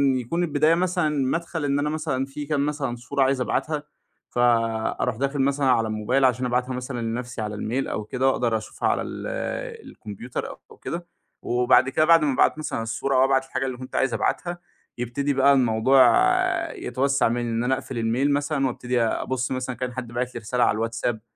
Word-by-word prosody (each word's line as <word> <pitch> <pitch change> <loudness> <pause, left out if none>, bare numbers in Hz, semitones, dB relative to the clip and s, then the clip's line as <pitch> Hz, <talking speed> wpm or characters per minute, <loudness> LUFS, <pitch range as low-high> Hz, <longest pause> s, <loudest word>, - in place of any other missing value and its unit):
يكون 145 +8 -1
البداية 155 0 +3
مثلًا 180 -2 +1 0.2
مَدْخَل 165 0 -2
إن 140 0 +1
أنا 145 +1 0
مثلًا 150 -4 -2
في 145 +2 -7
كام 145 -1 0
مثلًا 145 -4 -2
صورة 135 +3 -1
عايز 135 0 +1
أبعتها، 150 +3 -1 0.5
فأروح 115 -1 +1
داخل 140 +3 -1
مثلًا 140 +1 +1
على 115 -4 +3
الموبايل 110 +5 +1
عشان 125 0 +2
أبعتها 125 +1 0
مثلًا 125 -1 -4
لنَفْسي 120 +1 -4
على 105 -1 -4
الميل 120 +6 -2
أو 110 - -3
كده 130 +5 -1
وأقدر 120 -4 +1
أشوفها 110 - -3
على - - +1
ال - - -6 0.6
الكمبيوتر 110 +4 -6 0.2
أو - - -14
كده، 170 +1 -6 0.3
وبعد 125 +2 +3
كده 155 +4 +2
بعد 165 0 +6
ما 145 -2 +2
أبعت 130 - +3
مثلًا 150 -7 -3
الصورة 120 +4 -2
أو 130 - +5
أبعت 135 0 +2
الحاجة 135 0 -3
اللي 130 -2 -4
كنت 130 0 -9
عايز 135 -3 +1
أبعتها، 175 0 -1 0.4
يبتدي 130 +4 -1
بقى 140 +1 +5
الموضوع 130 +1 +4 0.7
يتوسَّع 135 +1 0
منّي، 120 +1 -1
إن 115 +1 -1
أنا 130 +2 +2
أقفل 130 -1 -7
الميل 120 +5 +1
مثلًا 145 -1 0
وأبتدي 125 -1 -1
أبُص 125 +3 -1
مثلًا 130 0 -2
إن - - -22
كان 125 -1 -3
حد 130 -1 -5
باعت 125 +1 -3
لي - - -3
رسالة 120 +3 0
على - - +3
الواتساب. 115 0 -2
130 Hz, 190 wpm, -24 LUFS, 120-140 Hz, 0.7 s, بعد